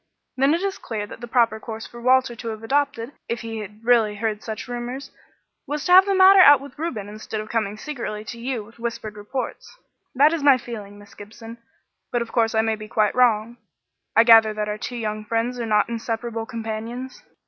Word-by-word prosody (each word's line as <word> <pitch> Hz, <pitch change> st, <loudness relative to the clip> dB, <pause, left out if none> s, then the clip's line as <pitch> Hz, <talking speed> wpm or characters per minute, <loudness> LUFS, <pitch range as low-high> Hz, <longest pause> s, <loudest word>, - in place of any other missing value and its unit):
Then 275 Hz, +4 st, +3 dB
it 345 Hz, -, -3 dB
is 390 Hz, -1 st, -2 dB
clear 215 Hz, -3 st, -4 dB
that 210 Hz, -, -11 dB
the 240 Hz, -, -6 dB
proper 230 Hz, -2 st, +2 dB
course 220 Hz, 0 st, -7 dB
for 235 Hz, -, -11 dB
Walter 255 Hz, 0 st, +3 dB
to 230 Hz, 0 st, -8 dB
have 220 Hz, -1 st, -5 dB
adopted, 280 Hz, -1 st, -1 dB, 0.2 s
if 235 Hz, -1 st, -2 dB
he 225 Hz, -1 st, -5 dB
had 210 Hz, +2 st, -10 dB
really 230 Hz, -4 st, +3 dB
heard 215 Hz, 0 st, -2 dB
such 220 Hz, +1 st, -6 dB
rumours, 245 Hz, +2 st, -6 dB, 0.6 s
was 295 Hz, 0 st, -3 dB
to 360 Hz, -, 0 dB
have 375 Hz, +1 st, +9 dB
had 400 Hz, -, 0 dB
the 390 Hz, -, +2 dB
matter 380 Hz, +1 st, +8 dB
out 290 Hz, -6 st, +8 dB
with 280 Hz, 0 st, -12 dB
Reuben, 240 Hz, -12 st, -4 dB
instead 215 Hz, +1 st, -6 dB
of 215 Hz, 0 st, -7 dB
coming 215 Hz, -3 st, -2 dB
secretly 220 Hz, -6 st, -6 dB
to 235 Hz, +1 st, -8 dB
you 240 Hz, -2 st, -3 dB
with 225 Hz, +3 st, -18 dB
whispered 230 Hz, -2 st, -5 dB
reports. 255 Hz, -, -6 dB, 0.4 s
That 290 Hz, +5 st, +5 dB
is 330 Hz, -, -2 dB
my 280 Hz, -2 st, +6 dB
feeling, 210 Hz, -5 st, -9 dB
Miss 205 Hz, 0 st, -16 dB
Gibson, 225 Hz, +3 st, -11 dB, 0.5 s
but, 240 Hz, -1 st, 0 dB
of 230 Hz, -, -13 dB
course, 225 Hz, -1 st, +1 dB
I 220 Hz, -, +4 dB
may 220 Hz, 0 st, 0 dB
be 215 Hz, 0 st, -10 dB
quite 215 Hz, -1 st, +1 dB
wrong. 235 Hz, -2 st, +2 dB, 0.6 s
I 225 Hz, -, +7 dB
gather 225 Hz, -2 st, +6 dB
that 210 Hz, 0 st, -2 dB
our 210 Hz, 0 st, -4 dB
two 245 Hz, -, -5 dB
young 215 Hz, -2 st, -3 dB
friends 230 Hz, +3 st, -2 dB
are 230 Hz, -, -3 dB
not 210 Hz, -1 st, +3 dB
inseparable 230 Hz, 0 st, -4 dB
companions?" 230 Hz, +2 st, -6 dB
230 Hz, 215 wpm, -23 LUFS, 215-255 Hz, 0.6 s, have